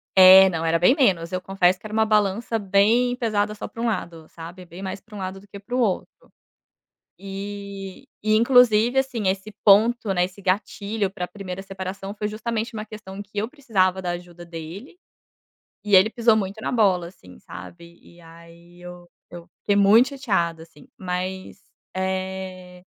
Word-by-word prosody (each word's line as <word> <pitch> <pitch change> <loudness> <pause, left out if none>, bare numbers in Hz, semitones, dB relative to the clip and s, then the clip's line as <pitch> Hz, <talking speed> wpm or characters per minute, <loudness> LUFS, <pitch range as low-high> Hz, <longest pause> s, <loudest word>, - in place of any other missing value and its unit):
É, 190 0 +9
não, 165 -2 -3
era 165 0 +2
bem 215 +10 +5
menos. 180 - +1
Eu 185 0 -3
confesso 185 -1 +1
que 215 - -18
era 215 - -7
uma 220 0 +3
balança 215 +2 +1
bem 220 +5 +2
pesada 215 -4 -1
só - - -6
pra 230 - -9
um - - -1
lado, 170 -7 -4
sabe? 175 +2 -11
Bem 175 +3 -11
mais 190 0 -5
pra 215 -2 -16
um - - -7
lado 190 +1 -5
do 200 - -19
que 200 - -10
para 235 +5 -6
o 255 - +1
outro. 210 -6 -2 0.9
E 200 +2 -8 0.2
e 215 - +3
inclusive, 240 0 +4
assim, 250 -6 -1
esse 195 +3 -3
ponto, 220 +1 +4
né, 180 -1 +2
esse 185 +2 -8
gatilho 200 +1 -2
pra 180 -3 -5
primeira 195 -3 -7
separação 195 +1 -7
foi 210 0 -3
justamente 225 +1 -4
uma 215 -1 -5
questão 210 -2 -10
que 205 - -12
eu 215 - -1
precisava 200 -10 0
da 180 -1 -3
ajuda 175 0 -9
dele, 170 - -9 0.9
e 205 -2 +3
ele 190 +4 +6
pisou 230 -1 +3
muito 200 +1 -4
na - - -3
bola, 195 -7 +2
assim, 90 - -16
sabe? 170 - -12
E 175 0 -19
aí 170 +1 -17
eu 180 0 -11 0.2
eu 175 0 -10
fiquei 205 - +1
muito 210 +6 +5
chateada, 190 - -2
assim. 160 -3 -19
Mas, 185 +1 -5 0.3
eh, 185 -1 -5
195 Hz, 180 wpm, -23 LUFS, 180-215 Hz, 0.9 s, É